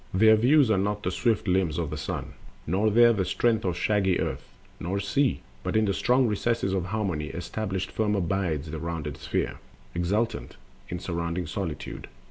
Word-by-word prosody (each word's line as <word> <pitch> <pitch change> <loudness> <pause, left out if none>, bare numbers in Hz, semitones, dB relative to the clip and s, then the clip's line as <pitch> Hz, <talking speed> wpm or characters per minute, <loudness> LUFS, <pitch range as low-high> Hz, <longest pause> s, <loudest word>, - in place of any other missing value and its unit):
27. 95 +4 +4
There 110 - +9
views 125 +2 +4
one 95 -2 +3
not 105 0 -2
the 90 - 0
swift 110 +2 +1
limbs 90 -4 +1
of 80 -3 -2
the - - -3
Sun, 75 - -4 0.3
Nor 100 +7 +2
there 120 +2 +6
the 100 -3 0
strength 110 +4 +1
of 90 -2 -1
shaggy 95 -1 +2
Earth, - - -3 0.3
nor 95 +4 -2
Sea; 130 +7 +1 0.2
But - - -3
in 110 - +3
the 100 - +1
strong 125 +5 +3
recess 115 +2 0
of 95 -2 0
Harmony, 90 -7 -2
Established 95 +3 -4
firm 105 -1 0
abides 85 -5 -1
the 80 - -4
rounded 80 -3 -4
Sphere, - - -2 0.3
Exultant 105 +7 -1 0.3
in 90 - -3
surrounding 85 0 -3
solitude. 80 -1 -5
95 Hz, 180 wpm, -27 LUFS, 85-110 Hz, 0.3 s, There